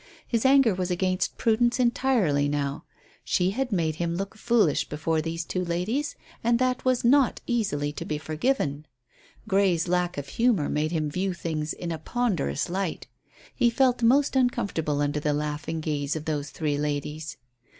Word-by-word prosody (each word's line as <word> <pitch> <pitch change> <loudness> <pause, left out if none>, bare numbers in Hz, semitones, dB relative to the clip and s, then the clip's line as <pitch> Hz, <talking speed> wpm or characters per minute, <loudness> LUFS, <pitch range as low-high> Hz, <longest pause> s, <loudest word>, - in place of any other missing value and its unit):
His 235 +2 +2
anger 270 -5 +5
was 180 0 -2
against 185 +1 0
Prudence 235 +2 +2
entirely 235 - +2
now. 145 -1 -2 0.4
She 180 +1 +1
had 250 +3 -2
made 160 -5 0
him 170 0 -1
look 195 +3 -4
foolish 220 -8 +2
before 155 +1 0
these 165 +1 -4
two 185 +2 -2
ladies, 180 +12 -2 0.3
and 235 +1 +3
that 255 +1 0
was 255 -1 +1
not 270 +1 +4
easily 150 - -1
to - - -5
be 150 - -3
forgiven. 155 - -1 0.6
Grey's 190 -3 +2
lack 180 -1 0
of 140 -1 -4
humour 225 - +1
made 155 +1 0
him 155 -3 0
view 185 +2 -1
things 155 -2 -3
in 175 -1 -5
a 160 - -4
ponderous 180 - -1
light. 185 -1 -3 0.5
He 245 -2 +3
felt 250 0 +2
most 270 +5 +3
uncomfortable 200 - 0
under 145 +1 0
the 150 0 0
laughing 150 +2 -3
gaze 150 -2 -2
of 155 -1 -5
those 150 -2 -2
three 150 -3 -2
ladies. 150 +1 -3
175 Hz, 165 wpm, -26 LUFS, 150-235 Hz, 0.6 s, anger